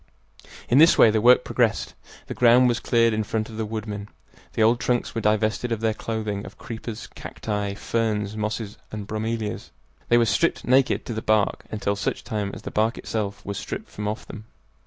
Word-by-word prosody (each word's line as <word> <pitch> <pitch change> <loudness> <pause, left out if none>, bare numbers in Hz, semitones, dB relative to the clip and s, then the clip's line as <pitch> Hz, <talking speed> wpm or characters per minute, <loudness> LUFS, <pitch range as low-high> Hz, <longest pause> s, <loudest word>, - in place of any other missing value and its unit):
In 125 - +4
this 165 +2 +7
way 110 - +7
the 110 0 +1
work 125 +2 +6
progressed. 115 -3 0 0.3
The - - -5
ground 125 +1 +5
was 120 0 +1
cleared 115 -2 +3
in 110 0 0
front 110 +1 -2
of 110 - -9
the 110 -1 -2
woodmen. 105 -2 -5 0.4
The 110 - +2
old 115 +2 +4
trunks 125 -1 0
were 115 - -2
divested 110 +3 +1
of 115 - 0
their 110 -1 +1
clothing 110 -2 -3
of - - -11
creepers, 115 -1 -7
cacti, 105 -2 -4
ferns, 105 -2 -1
mosses, 105 0 -4
and 105 -2 -5
bromelias. 110 0 -3 0.4
They 120 - +6
were 120 - +4
stripped 165 +8 +1
naked 130 +1 +3
to 120 - -4
the 110 - -3
bark, 110 -2 +1
until 100 -1 -1
such 100 - -3
time 105 -2 -2
as - - -10
the - - -6
bark 110 +2 +1
itself 100 -3 -4
was 100 -1 -4
stripped - - -6
from 105 0 -4
off 105 +1 -4
them. 110 -1 -9
110 Hz, 200 wpm, -24 LUFS, 105-115 Hz, 0.4 s, this